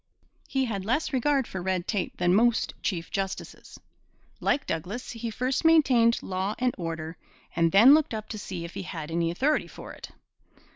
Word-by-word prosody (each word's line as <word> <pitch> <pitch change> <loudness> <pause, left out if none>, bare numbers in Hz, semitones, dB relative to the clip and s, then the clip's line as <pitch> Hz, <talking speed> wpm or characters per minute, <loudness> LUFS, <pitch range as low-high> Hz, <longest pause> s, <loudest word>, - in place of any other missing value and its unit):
He 265 -1 0
had 200 -5 -3
less 255 +9 -1
regard 270 +1 +2
for 190 - -6
red 185 -1 -2
tape 205 -4 -2
than 175 0 +2
most 235 +3 +3
chief 170 -4 -3
justices. 195 -1 -5 0.6
Like 285 - 0
Douglas, 190 +10 -4
he 230 0 -5
first 255 +4 -1
maintained 260 -8 +4
law 190 +3 -2
and 250 -1 +1
order 165 -2 -5 0.4
and 165 -1 +3
then 225 - +8
looked 305 -6 +2
up 215 0 -6
to 215 - -5
see 180 -3 -6
if 170 - -9
he 195 - -5
had 165 -4 -6
any 165 0 0
authority 270 - +1
for - - -10
it. - - -10
205 Hz, 180 wpm, -27 LUFS, 175-250 Hz, 0.6 s, then